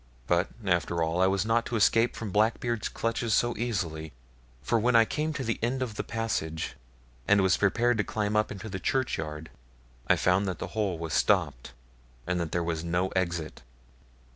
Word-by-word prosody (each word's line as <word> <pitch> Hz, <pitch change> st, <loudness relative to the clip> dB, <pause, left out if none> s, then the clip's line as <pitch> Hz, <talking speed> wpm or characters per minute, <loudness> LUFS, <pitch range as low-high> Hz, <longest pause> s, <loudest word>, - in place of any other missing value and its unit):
But, 85 Hz, +5 st, +2 dB, 0.2 s
after 85 Hz, -2 st, +1 dB
all, 80 Hz, +3 st, 0 dB
I 95 Hz, -, +5 dB
was 95 Hz, +1 st, +1 dB
not 115 Hz, +1 st, +2 dB
to 120 Hz, -, -3 dB
escape 115 Hz, +2 st, +3 dB
from 110 Hz, -4 st, -5 dB
Blackbeard's 110 Hz, +2 st, +1 dB
clutches 115 Hz, 0 st, -1 dB
so 120 Hz, -1 st, +1 dB
easily; 85 Hz, -, -3 dB, 0.5 s
for 115 Hz, -, +2 dB
when 120 Hz, +2 st, +2 dB
I 115 Hz, -1 st, +7 dB
came 155 Hz, +6 st, -2 dB
to 140 Hz, -, -3 dB
the 115 Hz, -2 st, -2 dB
end 130 Hz, +3 st, 0 dB
of 120 Hz, -4 st, -5 dB
the -, -, -3 dB
passage, 105 Hz, -9 st, -3 dB, 0.5 s
and 100 Hz, -1 st, +5 dB
was 95 Hz, -1 st, +4 dB
prepared 115 Hz, +4 st, +2 dB
to -, -, +3 dB
climb 105 Hz, 0 st, -2 dB
up 105 Hz, 0 st, +2 dB
into 100 Hz, +2 st, -7 dB
the 95 Hz, -2 st, -5 dB
churchyard, 80 Hz, -, -2 dB, 0.6 s
I -, -, +5 dB
found 95 Hz, +2 st, +2 dB
that 90 Hz, -3 st, -2 dB
the -, -, -5 dB
hole 100 Hz, -5 st, -1 dB
was 80 Hz, -2 st, -5 dB
stopped, -, -, +1 dB, 0.5 s
and 90 Hz, 0 st, -1 dB
that 85 Hz, -2 st, -3 dB
there 85 Hz, -, 0 dB
was 85 Hz, -1 st, -2 dB
no 90 Hz, +2 st, 0 dB
exit. 85 Hz, -4 st, -2 dB
100 Hz, 190 wpm, -28 LUFS, 85-115 Hz, 0.6 s, I